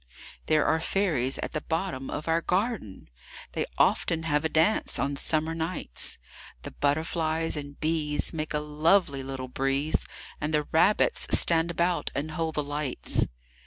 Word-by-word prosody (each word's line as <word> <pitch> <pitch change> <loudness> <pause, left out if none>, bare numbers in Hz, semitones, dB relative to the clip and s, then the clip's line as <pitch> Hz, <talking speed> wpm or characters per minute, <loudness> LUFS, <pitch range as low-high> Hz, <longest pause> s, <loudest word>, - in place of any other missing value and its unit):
There 155 -1 +3
are 160 - +2
fairies 155 -8 +1
at - - -4
the 155 - -3
bottom 160 -6 -3
of 150 - -5
our 165 +1 +2
garden! 185 - -2 0.4
They - - -2
often 165 -1 +2
have 150 -2 +1
a 160 - +1
dance 160 +8 +2
on 140 +1 -1
summer 155 +3 0
nights; 165 - -2 0.5
The - - -7
butterflies 160 +2 0
and 145 -1 -7
bees 155 -1 +1
make 155 -1 -3
a - - +2
lovely 150 0 +2
little 130 -1 -5
breeze, 135 +4 0 0.3
And 150 +1 0
the 150 - +2
rabbits 190 +6 +3
stand 165 0 +3
about 170 +1 0
and 150 +3 -2
hold 160 0 -2
the 150 - 0
lights. 145 - -1
155 Hz, 155 wpm, -27 LUFS, 145-165 Hz, 0.5 s, There